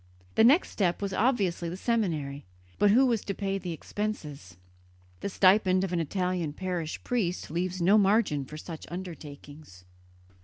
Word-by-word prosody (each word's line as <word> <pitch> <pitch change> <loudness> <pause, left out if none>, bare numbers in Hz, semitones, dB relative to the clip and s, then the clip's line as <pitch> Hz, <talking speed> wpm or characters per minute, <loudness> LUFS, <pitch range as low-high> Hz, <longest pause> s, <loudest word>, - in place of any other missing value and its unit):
The - - +4
next 280 +10 +5
step 180 -4 0
was 200 -1 -3
obviously 195 -8 +1
the 175 - -6
seminary; 160 - -1 0.4
but 205 - +5
who 250 +6 +5
was 235 -5 +1
to 200 - -3
pay 195 -1 -2
the 180 -2 -5
expenses? 155 - -5 0.6
The - - -3
stipend 185 -1 +4
of 190 -2 -2
an 175 - +1
Italian 180 -1 -1
parish 175 -3 -4
priest 190 -11 -2
leaves 180 +1 -2
no 200 +5 +6
margin 195 -8 +2
for 150 +3 -9
such 160 0 -8
undertakings. 150 - -9
185 Hz, 155 wpm, -28 LUFS, 160-205 Hz, 0.6 s, no